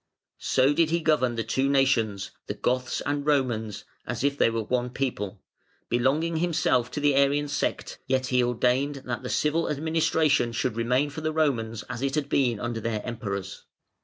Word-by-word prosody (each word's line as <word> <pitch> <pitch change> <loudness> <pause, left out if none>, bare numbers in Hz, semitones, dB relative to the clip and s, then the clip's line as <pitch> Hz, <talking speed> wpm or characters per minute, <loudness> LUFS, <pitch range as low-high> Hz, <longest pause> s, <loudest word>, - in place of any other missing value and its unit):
So 135 +2 +3
did 160 +1 +2
he 170 +1 +1
govern 150 -7 +2
the 115 - -1
two 130 +5 0
nations, 115 -8 +1 0.2
the 105 - -3
Goths 125 +4 -1
and 145 0 -1
Romans, 125 -8 0 0.2
as - - -3
if 140 0 +2
they 140 - +3
were 115 -1 -2
one 125 +2 -1
people, 110 -7 -3 0.5
belonging 145 +8 +1
himself 155 -7 +1
to - - -2
the 145 -1 +3
Arian 140 +2 +3
sect, 145 - -2
yet 130 0 +1
he 125 -1 +2
ordained 125 +4 0
that 120 -1 -3
the 125 - -6
civil 155 +2 +1
administration 155 -4 +1
should 120 0 -1
remain 125 +5 +1
for 155 - -6
the 155 0 -1
Romans 120 -8 0
as 125 -1 -5
it 135 0 -1
had 145 -2 -1
been 120 -6 +1
under 120 -1 -3
their 110 -1 -3
Emperors. 100 -5 -5
130 Hz, 180 wpm, -26 LUFS, 115-145 Hz, 0.5 s, So